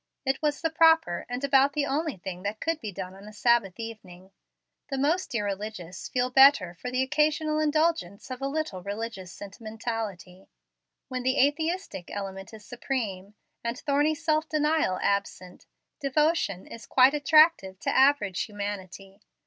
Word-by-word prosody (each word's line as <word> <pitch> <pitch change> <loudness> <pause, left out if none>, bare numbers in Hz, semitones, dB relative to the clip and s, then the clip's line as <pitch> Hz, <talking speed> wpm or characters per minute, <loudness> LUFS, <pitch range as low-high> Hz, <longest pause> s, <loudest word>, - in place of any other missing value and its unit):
It 265 0 0
was 300 -1 0
the 325 -1 0
proper, 320 - +3
and 245 +2 -4
about 275 0 +4
the 295 -1 0
only 295 -2 -2
thing 180 0 -7
that 205 +3 -4
could 325 -1 -1
be 215 - -5
done 185 -1 -7
on 195 +2 -13
a - - -9
Sabbath 215 -3 +1
evening. 190 -5 -9 0.6
The 270 - -2
most 295 +1 0
irreligious 200 -4 -4
feel 250 0 0
better 265 -9 +6
for 250 +8 -7
the 255 +1 +1
occasional 305 +2 +1
indulgence 310 - 0
of 255 +1 -6
a 275 - -1
little 280 -10 -3
religious 200 -2 -6
sentimentality. 210 -3 -6 0.6
When 255 -1 -4
the 260 +2 0
aesthetic 320 - -4
element 195 0 -6
is 215 -2 -12
supreme, 210 -6 -4 0.3
and 235 +1 -3
thorny 295 +2 +1
self 310 +1 0
denial 300 -10 +1
absent, 200 -2 -2 0.3
devotion 285 - +1
is 230 -2 -11
quite 260 +2 +5
attractive 300 - +4
to - - -1
average 265 -9 +3
humanity. 200 -1 -7
240 Hz, 150 wpm, -27 LUFS, 195-295 Hz, 0.6 s, better